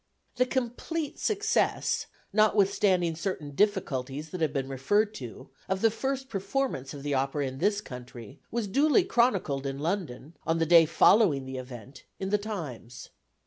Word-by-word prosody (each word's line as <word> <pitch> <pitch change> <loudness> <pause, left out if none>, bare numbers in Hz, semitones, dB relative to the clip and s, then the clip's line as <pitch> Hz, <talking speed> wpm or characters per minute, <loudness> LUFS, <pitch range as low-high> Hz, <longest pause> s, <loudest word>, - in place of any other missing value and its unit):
The 250 - +3
complete 265 +5 -3
success, 430 0 +1 0.3
notwithstanding 200 -4 +3
certain 165 -4 -4
difficulties 150 -5 -1
that 180 - -5
have 155 -3 +2
been 135 -3 -2
referred 205 +12 +1
to, 130 - -9 0.2
of 190 0 0
the 225 - +4
first 265 +3 -3
performance 195 - -2
of 140 - -9
the 145 0 -1
opera 135 +2 0
in 130 0 -5
this 205 +4 +1
country, 125 - -10
was 235 -1 -2
duly 295 - +4
chronicled 200 - +1
in 135 0 -4
London, 160 -3 -3
on 165 - 0
the 165 - +2
day 165 0 +7
following 165 -5 +4
the 130 0 -5
event, 125 0 -10
in 190 0 -3
The 210 - +3
Times. 145 - -7
170 Hz, 155 wpm, -28 LUFS, 135-215 Hz, 0.3 s, day